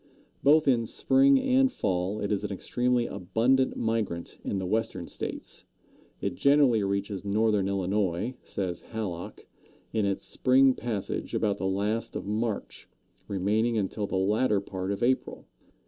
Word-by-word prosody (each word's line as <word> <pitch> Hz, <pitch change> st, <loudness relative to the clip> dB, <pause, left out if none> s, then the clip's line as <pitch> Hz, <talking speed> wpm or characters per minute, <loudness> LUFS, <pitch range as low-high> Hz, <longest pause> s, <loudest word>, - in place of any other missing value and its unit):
Both 150 Hz, +2 st, +5 dB
in 120 Hz, -4 st, +3 dB
spring 275 Hz, -, +4 dB
and 265 Hz, 0 st, +3 dB
fall 95 Hz, -, -1 dB
it 100 Hz, -, -2 dB
is 105 Hz, 0 st, 0 dB
an 105 Hz, -, -3 dB
extremely 120 Hz, +5 st, 0 dB
abundant 120 Hz, +8 st, +1 dB
migrant 110 Hz, -7 st, -2 dB
in 100 Hz, -, -2 dB
the 95 Hz, -, -2 dB
Western 105 Hz, -3 st, -1 dB
States. -, -, -6 dB, 0.5 s
It -, -, -2 dB
generally 140 Hz, -6 st, +4 dB
reaches 100 Hz, 0 st, -2 dB
northern 105 Hz, -1 st, +1 dB
Illinois, 100 Hz, +2 st, -1 dB
says 90 Hz, -3 st, -4 dB
Hallock, 95 Hz, -6 st, -6 dB, 0.5 s
in 110 Hz, -3 st, +1 dB
its 100 Hz, -, -2 dB
spring 130 Hz, +1 st, +4 dB
passage 115 Hz, -5 st, -4 dB
about 105 Hz, -2 st, 0 dB
the 95 Hz, -, -1 dB
last 105 Hz, +4 st, -1 dB
of -, -, -4 dB
March, 105 Hz, +1 st, -3 dB, 0.4 s
remaining 105 Hz, +4 st, +1 dB
until 100 Hz, 0 st, -2 dB
the -, -, -3 dB
latter 105 Hz, +3 st, +2 dB
part 95 Hz, -1 st, -4 dB
of 100 Hz, -, -3 dB
April. 130 Hz, +2 st, 0 dB
105 Hz, 145 wpm, -28 LUFS, 95-120 Hz, 0.5 s, Both